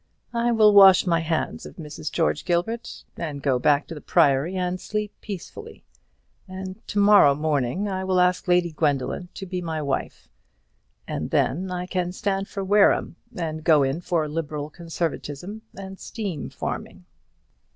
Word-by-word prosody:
I 235 0 +1
will 215 -2 +5
wash 195 -2 +8
my 170 -2 +2
hands 165 -1 -2
of - - -10
Mrs. 155 -2 -7
George 160 -2 0
Gilbert, 190 +7 -2
and 155 -4 -4
go 135 -3 +1
back 145 +3 +3
to - - -8
the 150 - -9
Priory 140 +6 +2
and 180 0 -2
sleep 210 -1 -3
peacefully; 195 -5 -8 0.6
and 190 +2 -7
to - - -5
morrow 200 -8 +6
morning 150 +4 -1
I 190 -1 -3
will 190 -1 +1
ask 180 +1 +2
Lady 175 -1 +3
Gwendoline 150 +2 -1
to 195 - -6
be 180 -1 -4
my 160 -2 -3
wife; 140 -3 -3 0.8
and - - -3
then 180 +9 0
I 180 0 -3
can 180 -1 -2
stand 195 0 -2
for 195 - -5
Wareham, 200 -2 +3 0.2
and 155 -4 -4
go 155 -3 +5
in 135 +5 -1
for 165 -3 0
liberal 150 -1 -4
conservatism 170 +3 -5 0.2
and 195 -1 -8
steam 195 -9 -5
farming." - - -6
175 Hz, 160 wpm, -24 LUFS, 155-190 Hz, 0.8 s, wash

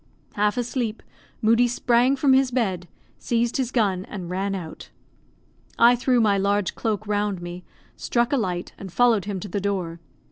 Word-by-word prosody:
Half 210 +2 +1
asleep, 240 -2 -2 0.4
Moodie 230 +3 +4
sprang 245 +2 +2
from 270 -1 +3
his 265 0 +4
bed, 195 -8 -1 0.3
seized 235 0 0
his 260 -3 -1
gun, 200 -7 +1
and 180 -4 -7
ran 195 +2 -1
out. 165 -4 -8 0.9
I 240 +1 +6
threw 250 0 +2
my 205 -3 +3
large 200 0 0
cloak 215 -2 -2
round 205 -2 -1
me, 175 +1 -8 0.3
struck 240 +2 0
a - - +3
light, 180 -6 -3
and 190 -2 -8
followed 225 0 +3
him 200 -2 -3
to 205 - -6
the 200 +1 -3
door. 185 -4 -2
210 Hz, 170 wpm, -24 LUFS, 190-240 Hz, 0.9 s, I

